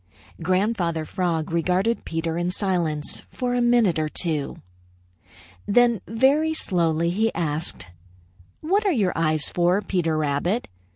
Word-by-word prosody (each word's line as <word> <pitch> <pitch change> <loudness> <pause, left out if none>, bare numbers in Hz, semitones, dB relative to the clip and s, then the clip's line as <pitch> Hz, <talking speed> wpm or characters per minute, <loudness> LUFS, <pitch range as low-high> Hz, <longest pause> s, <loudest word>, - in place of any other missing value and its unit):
Grandfather 185 -2 0
Frog 165 -2 -2
regarded 180 +7 0
Peter 165 0 -2
in 175 +1 -1
silence 175 -6 -1
for 250 -1 -2
a 245 - +1
minute 240 -8 +3
or 155 -1 -1
two. 155 -4 -2 1.1
Then 235 -1 +3
very 280 +8 +2
slowly 170 - +1
he 220 +5 +1
asked: 155 - -2 0.8
"What 390 +7 +1
are 400 - +2
your 205 - +1
eyes 155 -2 +1
for, 175 +2 +2
Peter 175 -6 -1
Rabbit? 155 +9 0
180 Hz, 125 wpm, -24 LUFS, 160-225 Hz, 1.1 s, minute